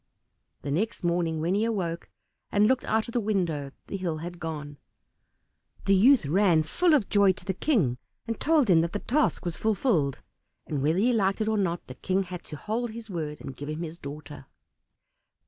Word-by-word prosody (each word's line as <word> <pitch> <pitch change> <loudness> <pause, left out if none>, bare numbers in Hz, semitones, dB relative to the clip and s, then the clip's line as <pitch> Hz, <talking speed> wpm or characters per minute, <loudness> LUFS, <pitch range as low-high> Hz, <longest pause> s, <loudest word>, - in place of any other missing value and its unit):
The 140 - -3
next 205 +9 -1
morning 170 -2 0
when 170 +3 +1
he 205 +2 +2
awoke 185 -7 -2 0.4
and 205 +1 +4
looked 255 +3 +2
out 220 0 +1
of - - -6
the 240 - +1
window 175 -10 -1 0.2
the 195 - -4
hill 175 -4 -2
had 175 +2 -7
gone. 150 -3 -6 1.1
The 195 - +4
youth 230 - +6
ran, 170 +1 +3
full 325 - +3
of 245 -9 +1
joy, 200 -2 +4
to - - -11
the 190 - -1
King, 175 - +1 0.3
and 230 - -4
told 305 -4 +3
him 170 -4 +5
that 170 +2 -2
the - - 0
task 295 -1 0
was 170 -2 -2
fulfilled, 200 - +1 0.5
and 145 -3 -2
whether 155 +5 +2
he 240 +6 +3
liked 195 -3 +1
it 215 - 0
or 220 -1 +1
not, 175 -3 -1
the 130 - -9
King 190 +8 0
had 180 -1 -8
to - - -7
hold 220 +9 -2
to - - -9
his 230 -2 -8
word 155 -4 -4
and 135 - -7
give 145 +3 -7
him 155 +2 -3
his 165 +1 -7
daughter. 145 0 -9
180 Hz, 205 wpm, -27 LUFS, 155-215 Hz, 1.1 s, youth